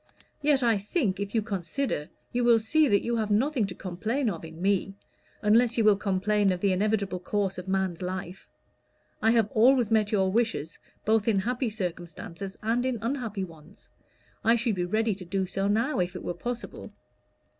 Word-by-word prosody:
Yet 285 -3 +3
I 230 -4 +3
think, 205 - -1
if 200 +2 -4
you 220 - +2
consider, 195 - -3 0.2
you 245 0 +1
will 235 -1 +6
see 295 +8 +3
that 205 -5 +3
you 235 0 0
have 215 -2 -1
nothing 235 +1 +2
to 180 - -7
complain 215 +8 -2
of 165 -3 -7
in 160 0 -10
me, 195 +1 0 0.5
unless 230 +3 +4
you 225 - +3
will 210 -1 +6
complain 200 0 +1
of 180 - -2
the 200 +1 +2
inevitable 200 -1 0
course 195 0 -1
of 180 - -9
man's 190 -2 -1
life. 185 0 -5 0.7
I 220 - +4
have 225 -3 +3
always 240 0 +4
met 215 -2 +3
your 190 -3 +2
wishes 225 -8 -1 0.3
both 220 0 +2
in 220 -3 +3
happy 245 +5 0
circumstances 180 -1 -6
and 230 +3 +1
in 255 -2 0
unhappy 225 -4 -3
ones. 165 +1 -13 0.5
I 230 +1 +5
should 235 -1 0
be 180 -2 -1
ready 220 +4 +1
to 190 -1 -9
do 190 +2 -1
so 195 +2 -2
now, 225 +5 +1
if 180 0 -1
it 180 - -6
were - - -2
possible." 245 +5 -6
205 Hz, 190 wpm, -27 LUFS, 190-230 Hz, 0.7 s, will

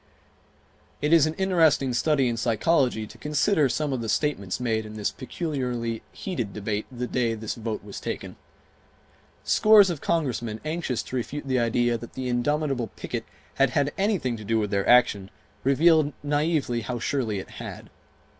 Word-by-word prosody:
It 150 +2 +1
is 160 -2 +6
an 155 - -3
interesting 165 -9 +3
study 140 +1 +2
in 120 - 0
psychology 115 +1 +1
to - - -14
consider 150 0 +2
some 150 0 -1
of 125 - -2
the 115 - -4
statements 105 -12 -1
made 110 -3 0
in 110 0 -9
the 105 -1 -1
peculiarly 125 -6 -3
heated 120 - -4
debate 105 0 -3
the 125 -1 -4
day 120 -2 0
this 110 -1 -4
vote 110 -2 -4
was 100 -1 -8
taken. - - -5 1.1
Scores 210 -3 +6
of 160 - -5
Congressmen, 120 -9 -1
anxious 155 -6 -2
to - - -7
refute 140 +4 -4
the 130 -1 +1
idea 120 0 +1
that 120 - -10
the 130 -1 -4
indomitable 135 0 0
picket - - -5 0.3
had 135 -1 +3
had 145 +2 0
anything 190 - 0
to 110 - -9
do 115 +2 0
with 105 -2 -1
their 100 -1 0
action, 115 -6 +4 0.3
revealed 150 +2 +4
naively 145 -4 0
how 120 +2 -4
surely 120 -3 -1
it 95 - -7
had. - - -8
125 Hz, 165 wpm, -26 LUFS, 115-150 Hz, 1.1 s, is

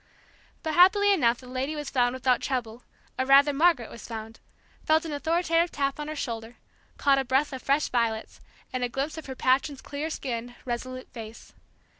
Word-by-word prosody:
But 315 - -2
happily 400 +4 +6
enough 240 -10 +3
the 255 - -14
lady 260 +4 -3
was 295 -1 -5
found 245 -1 +2
without 255 -1 +2
trouble, 245 -3 -3 0.4
or 260 - +2
rather 280 +2 +6
Margaret 295 -5 +3
was 235 - -10
found, 225 -1 -7 0.4
felt 315 +2 +3
an 320 - -4
authoritative 330 +3 +1
tap 275 0 -1
on 295 - -4
her 310 - -4
shoulder, 230 -4 -5 0.4
caught 275 -1 +3
a - - 0
breath 265 +3 +1
of 260 - -5
fresh 280 +2 +2
violets, 230 -2 -1 0.3
and 255 -1 -1
a 245 - 0
glimpse 275 +6 -3
of 315 - -11
her 265 - -6
patron's 265 +2 +1
clear 290 +4 -5
skinned, 245 -5 -4
resolute 255 +1 -5
face. 225 -1 -10
270 Hz, 185 wpm, -27 LUFS, 245-300 Hz, 0.4 s, happily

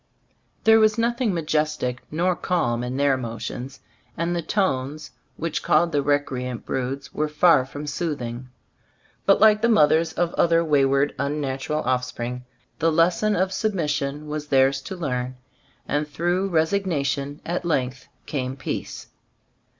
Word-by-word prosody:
There 220 0 +6
was 215 0 +4
nothing 235 0 +1
ma 170 -2 -1
jestic 150 -5 -1
nor 175 +4 +1
calm 120 -12 0
in 125 +1 -3
their 140 -1 +3
motions, 120 +2 -6 0.4
and 170 +1 -1
the 170 - -1
tones 150 -5 -1 0.3
which 165 +1 -2
called 170 +2 +3
the 145 - +1
recreant 130 -4 -1
broods 135 +1 -3
were 155 - 0
far 150 -3 +4
from 145 +2 -7
soothing; 130 -6 -4 0.8
but 195 - +5
like 215 -1 +6
the 235 - +3
mothers 160 -5 +4
of 175 -1 0
other 170 0 +3
wayward, 140 -1 +2
unnatural 140 +1 -2
offspring, 125 -1 -2 0.3
the 165 +1 +3
lesson 175 +6 +2
of 190 +1 0
sub 215 +2 -1
mission 150 -2 -2
was 150 0 -4
theirs 135 -1 +3
to 190 - -7
learn; 130 -6 -3 0.5
and 150 +1 0
through 175 +5 -1
resignation 155 -5 0
at 175 +2 -2
length 130 -6 -1 0.2
came 130 -3 -3
peace. 135 - -5
150 Hz, 140 wpm, -24 LUFS, 135-170 Hz, 0.8 s, There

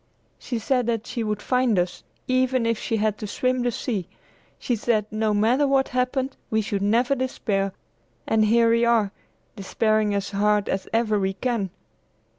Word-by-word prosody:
"She 245 - -4
said 245 +2 0
that 230 -2 -1
she 235 - -3
would 210 -1 -3
find 250 -4 +2
us, 175 0 -1 0.2
even 255 -1 +2
if 230 -1 0
she 225 - -1
had 210 -1 0
to 210 - -5
swim 255 +4 0
the 245 - +1
sea! 215 -6 -3 0.5
She 245 - -1
said 215 -1 0
no 215 0 0
matter 230 +7 +3
what 270 -1 +2
happened 255 +1 -1
we 220 - +1
should 205 -2 -2
never 235 +6 +2
despair, 210 -7 -1 0.5
and 220 -1 +2
here 230 +1 +4
we 230 +1 +3
are 230 -4 +3 0.4
despairing 215 +1 +1
as 200 0 -2
hard 210 0 +2
as 190 - -2
ever 220 -2 +1
we 190 0 0
can." 225 -2 -2
225 Hz, 175 wpm, -24 LUFS, 210-250 Hz, 0.5 s, here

